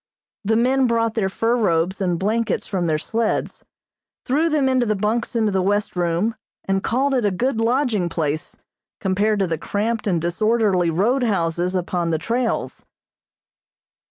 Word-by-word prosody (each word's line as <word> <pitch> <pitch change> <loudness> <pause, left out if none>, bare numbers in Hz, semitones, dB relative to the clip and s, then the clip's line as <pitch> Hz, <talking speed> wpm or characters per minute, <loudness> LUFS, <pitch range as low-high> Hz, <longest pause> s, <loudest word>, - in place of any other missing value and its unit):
The 220 +2 +1
men 255 +3 +3
brought 230 -1 +1
their 210 -4 0
fur 225 +5 0
robes 185 -4 +1
and 180 -3 0
blankets 220 +5 -1
from 180 -4 -2
their 155 -1 +1
sleds, 225 +8 -2 0.6
threw 305 +6 +2
them 300 -4 +2
into 255 -2 +2
the 215 - +1
bunks 215 +4 -1
in 225 -1 +2
the 195 -3 +1
west 205 +2 0
room, 175 +5 0 0.3
and 195 0 0
called 270 +4 +1
it 250 -3 +1
a 205 - +3
good 225 +5 -1
lodging 230 -6 +1
place 155 -2 -3 0.4
compared 205 +2 +1
to 195 - +1
the 165 -3 -2
cramped 215 +5 -2
and 175 -4 +1
disorderly 190 +1 +1
roadhouses 185 -3 0
upon 175 -1 -1
the 160 - +1
trails. 230 +7 -2
210 Hz, 155 wpm, -21 LUFS, 180-235 Hz, 0.6 s, men